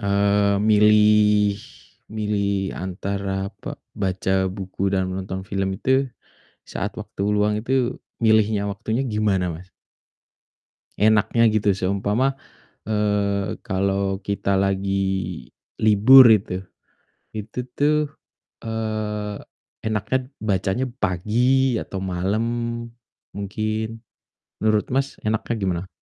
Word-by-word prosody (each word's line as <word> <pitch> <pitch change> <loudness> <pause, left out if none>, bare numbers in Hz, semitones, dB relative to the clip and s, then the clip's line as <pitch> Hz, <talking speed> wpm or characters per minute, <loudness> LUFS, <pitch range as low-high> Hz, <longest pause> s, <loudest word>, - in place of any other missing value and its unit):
eee, 100 0 +2
milih, 105 -1 +4 0.5
milih 100 -2 -1
antara 95 +1 -3
pa - - -6 0.2
baca 95 0 0
buku 95 0 -3
dan 95 -1 0
menonton 95 0 -5
film 95 0 -2
itu, 130 +3 +1 0.5
saat - - -5
waktu 100 - -6
luang 105 0 +2
itu 125 +2 0 0.2
milihnya 110 -2 +3
waktunya 110 +5 -2
gimana, 105 -7 0
Mas? 85 +3 -8 1.3
Enaknya 110 +2 +3
gitu. 105 -1 +2
Seumpama, 100 +8 0 0.5
eee, 105 -1 0
kalo 95 0 -1
kita 100 -1 0
lagi 95 -2 -1 0.3
libur 110 +5 +8
itu. 95 -3 -1 0.7
Itu 110 +3 -7 0.2
tuh, 150 +1 +3 0.7
eee, 110 -2 -3 0.5
enaknya 110 +3 0 0.2
bacanya 100 +3 0
pagi 120 +7 +2
atau 95 - -5
malam 95 +4 -1 0.9
mungkin. 110 +2 -3 0.6
Menurut 110 -1 +2
Mas 135 +1 0
enaknya 110 +2 -1
gimana? 95 -2 -2
100 Hz, 95 wpm, -23 LUFS, 95-110 Hz, 1.3 s, libur